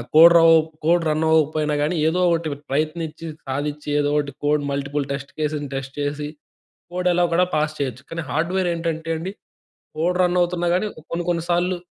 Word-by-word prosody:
Code 170 +2 +9
ర - - +6
ఓప్ 160 0 +3 0.2
code 170 +1 +3
run 155 +1 +1
అవ్వకపోయినా 155 -1 +2
కానీ 155 +4 0
ఏదో 175 +3 +1
ఒకటి 165 -1 0 0.2
ప్రయత్నించి 155 +3 -2 0.2
సాధించి 145 +2 -3
ఏదో 145 0 +1
ఒకటి 145 -1 -1
కోడ్ 150 0 +2
మల్టిపుల్ 140 0 -2
టెస్ట్ 140 0 -5
కేస్‌ని 150 -1 -2
టెస్ట్ 135 0 -5
చేసి 145 +1 -2 0.7
కోడ్ 180 0 0
ఎలాగోలా 175 0 +2
పాస్ 155 0 0
చేయొచ్చు. 130 -2 -3
కానీ, 165 0 -4
హార్డ్‌వేర్ 175 +4 0
ఏంటంటే 165 -1 -3
అండి 185 +4 -5 0.7
కోడ్ 180 +3 0
రన్ 180 0 +2
అవుతున్నా 175 0 0
కానీ 200 +4 0 0.2
కొన్ని, 170 0 -2
కొన్ని 170 -1 0
సార్లు 175 +1 +1
160 Hz, 170 wpm, -22 LUFS, 145-175 Hz, 0.7 s, కోడ్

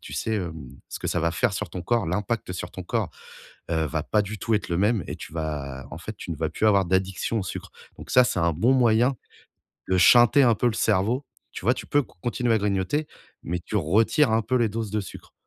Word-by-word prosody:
tu - - -11
sais, 110 - -2
hem, 80 -9 -4 0.2
ce - - -5
que - - -5
ça 85 - 0
va 85 +1 +1
faire 100 +5 0
sur 100 -3 -4
ton 90 - -5
corps. 120 0 +1
L'impact 100 +3 -2
sur 90 - -6
ton - - -7
corps, - - -1 0.6
heu, 80 -1 +1
va 75 -1 -3
pas 105 - +2
du 105 +1 -6
tout 115 +4 0
être 105 - -1
le 85 - 0
même 105 +1 +2
et - - -4
tu - - -10
vas, 75 -4 -4
en - - -7
fait, 105 +6 -8
tu 95 - -8
ne 85 - -3
vas 80 +1 -2
plus 110 - 0
avoir 100 -3 +4
d'addiction 95 +5 0
au - - -2
sucre. 95 - -6 0.3
Donc - - -10
ça, 125 - +7
c'est - - -1
un 85 0 +2
bon 110 - +2
moyen 125 +1 +3 0.7
de 95 - +3
shunter 120 +8 +6
un 120 -3 +5
peu 125 - +1
le 120 - 0
cerveau, 110 +6 +1 0.3
tu - - -8
vois? 120 - +5
Tu 125 - -8
peux 145 0 +2
con - - -22
continuer 120 -1 0
à - - +4
grignoter, 100 +9 0 0.4
mais 85 +2 -2
tu 90 - -7
retires 110 - +3
un 110 - +3
peu 125 +4 -1
les 120 -3 +2
doses 110 -1 -4
de 105 0 0
sucre. 95 - -11
105 Hz, 250 wpm, -25 LUFS, 85-115 Hz, 0.7 s, ça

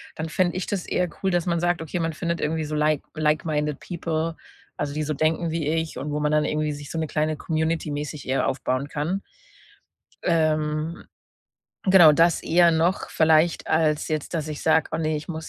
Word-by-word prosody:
dann 160 - -4
fände 175 +2 +1
ich 185 - -3
das 195 -3 -2
eher 180 -1 0
cool, 190 - +2
dass 175 -1 +1
man 170 -2 0
sagt. 175 -1 0
„Okay, 165 +2 -4
man 165 -1 -1
findet 170 +1 -3
irgendwie 155 +1 -1
so 150 0 -4
like 150 -1 +2
like-minded 150 -1 0
people, 165 -2 -3 0.4
also 145 -1 -3
die 155 0 -2
so 155 - -2
denken 160 +3 0
wie 160 -2 -2
ich 160 0 -1
und 145 +3 -4
wo 150 - -1
man 150 0 0
dann 150 0 +3
irgendwie 150 0 -1
sich 145 0 -9
so 165 - -4
'ne 160 - -1
kleine 155 0 -1
Community 160 -1 -1
mäßig 145 0 -5
eher 130 +1 +1
aufbauen 130 +1 -1
kann.“ 160 +8 -2 1.0
Ähm, 155 -1 0 0.8
genau, 185 -5 +8
das 165 +2 +3
eher 170 +1 +4
noch, 165 +4 +1
vielleicht 160 +1 +3
als 155 -2 +1
jetzt, 155 +1 -3
dass 155 -2 -2
ich 150 - -6
sage: 160 0 +3
„Oh - - 0
ne, 155 -1 0
ich 150 - -7
muss 160 -1 -5
155 Hz, 200 wpm, -24 LUFS, 150-165 Hz, 1.0 s, genau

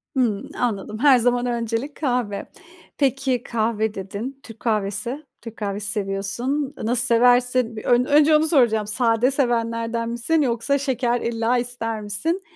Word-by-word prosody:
Hımm. 230 -6 0
Anladım, 215 -3 -2
her 275 0 +6
zaman 245 +1 +1
öncelik 235 +3 -2
kahve. 245 -8 -2 0.5
Peki, 265 -3 0
kahve 220 -1 -1
dedin, 205 +8 -6
Türk 225 -1 -12
kahvesi, 215 +6 -2 0.2
Türk 230 -1 -10
kahvesi 205 0 -3
seviyorsun. 220 +8 -2
Nasıl 235 +2 +1
seversin? 245 0 +3
Bir 215 - -7
ön 245 +1 +3
önce 300 +2 +5
onu 310 +1 +3
soracağım, 235 -9 +3
sade 230 +3 +2
sevenlerden 230 -3 -1
misin 240 +7 +1
yoksa 250 +1 +1
şeker 250 -3 0
illa 230 +1 0
ister 235 -2 -3
misin? 210 - -1
235 Hz, 140 wpm, -22 LUFS, 220-255 Hz, 0.5 s, her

